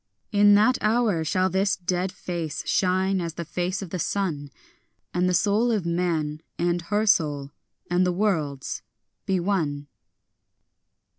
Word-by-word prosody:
In 205 -1 +6
that 220 +5 +4
hour 215 -6 +2
shall 185 +4 +1
this 190 +2 +1
dead 180 +1 -1
face 170 -6 -5
shine 190 0 +1
as 170 -2 -4
the 170 - -5
face 180 +4 -2
of 180 - -9
the 185 - -3
sun, 160 -6 -2 0.6
And 180 +1 +2
the - - +1
soul 215 +4 +2
of 210 -6 0
man 165 -3 -1 0.2
and 175 0 0
her 205 +5 0
soul 145 -8 +2 0.4
and 175 +1 +2
the 180 - +2
world's 165 -8 -1 0.5
be 190 -1 +2
one. 160 -6 -1
180 Hz, 145 wpm, -25 LUFS, 165-200 Hz, 0.6 s, In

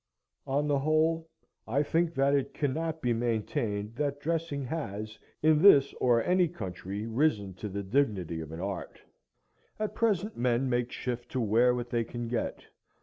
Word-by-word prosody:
On 145 +2 +1
the 145 -1 +2
whole, 160 +2 +1 0.4
I 135 +6 +2
think 165 +2 0
that 135 +1 +3
it 140 -2 0
cannot 160 +3 -2
be 120 -1 +2
maintained 115 -1 -2
that 145 -1 -1
dressing 160 -2 -2
has 110 -7 -5 0.2
in 155 -1 +5
this 145 -8 +7
or 120 -2 +4
any 180 0 +3
country 100 - -6
risen 115 -5 +1
to 105 - -3
the 100 +1 -4
dignity 95 - 0
of 80 -1 -8
an 80 +1 -6
art. 100 -1 -5 0.8
At 215 0 -2
present 215 -2 0
men 125 +1 +1
make 120 -1 0
shift 120 -1 -4
to 130 - 0
wear 120 +2 +3
what 120 -1 -5
they 120 -1 +1
can 120 +1 -5
get. 120 -1 -3
125 Hz, 165 wpm, -29 LUFS, 110-155 Hz, 0.8 s, this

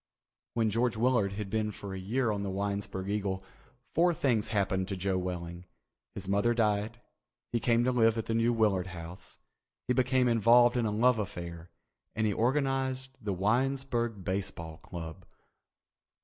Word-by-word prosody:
When 110 -2 +2
George 115 +1 +1
Willard 115 -4 +2
had 105 0 -4
been 110 -1 0
for 100 -1 -7
a 95 - -5
year 115 +5 0
on 100 -1 -2
the 100 - -2
Winesburg 100 -1 -3
Eagle, 100 -2 -2 0.5
four 175 +1 +3
things 120 -8 +1
happened 95 -3 0
to 100 -1 -3
Joe 95 +1 0
Welling. 90 -1 -5 0.5
His 95 -1 -6
mother 100 +4 +2
died, 110 0 0 0.5
he 120 - +1
came 115 0 +3
to 130 - +2
live 115 -2 +3
at 115 - -2
the 115 - -2
New 115 +1 +3
Willard 105 -6 +2
House, 85 +1 -9 0.5
he 125 - +3
became 130 0 +2
involved 120 +1 +5
in 120 -2 +1
a - - -1
love 115 +2 +3
affair, 85 -4 -6 0.5
and 110 -1 +1
he 105 - +2
organized 130 +2 0
the 105 -2 -2
Winesburg 120 +1 0
Baseball 90 -4 -3
Club. 80 +1 -8
105 Hz, 165 wpm, -30 LUFS, 95-120 Hz, 0.5 s, involved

